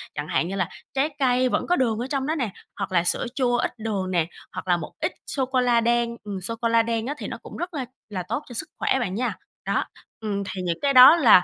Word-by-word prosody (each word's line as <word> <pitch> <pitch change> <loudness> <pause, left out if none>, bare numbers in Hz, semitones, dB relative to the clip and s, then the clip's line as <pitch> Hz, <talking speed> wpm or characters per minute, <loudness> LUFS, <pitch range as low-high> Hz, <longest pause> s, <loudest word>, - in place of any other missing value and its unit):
chẳng 150 0 -4
hạn 165 - +1
như 195 - -4
là 185 -3 0 0.2
trái 275 +3 +2
cây 255 -1 +3
vẫn - - 0
có 355 - +3
đường 230 -8 +1
ở 250 - -2
trong 275 -2 -1
đó 315 - 0
nè, 245 -8 -1 0.3
hoặc 200 -1 -3
là 170 -2 +3
sữa 175 - +1
chua 245 -3 +2
ít - - 0
đường 200 -4 -2
nè, 170 -3 +2 0.3
hoặc - - -6
là 175 -1 +4
một 170 - -7
ít - - 0 0.2
sô 265 -2 -1
cô 260 0 +1
la 240 -2 +3
đen. 235 0 +1
Ừm, 200 -3 -5
sô 230 +5 -3
cô 235 - +2
la 230 0 +4
đen 230 +1 -1
á 290 - -1
thì - - -5
nó - - -5
cũng - - -9
rất 350 0 -4
là 270 -4 -3 0.2
là 185 -3 -3
tốt 235 - -3
cho - - -8
sức 230 - -4
khỏe 265 - +2
bạn 195 -6 -2
nha. 245 +3 0 0.3
Đó, - - +1 0.3
ừm, 205 -2 -2
thì 190 -1 -5
những 175 -2 -1
cái 280 -1 +2
đó 255 +5 +10
là 225 - +7
235 Hz, 280 wpm, -24 LUFS, 195-260 Hz, 0.3 s, đó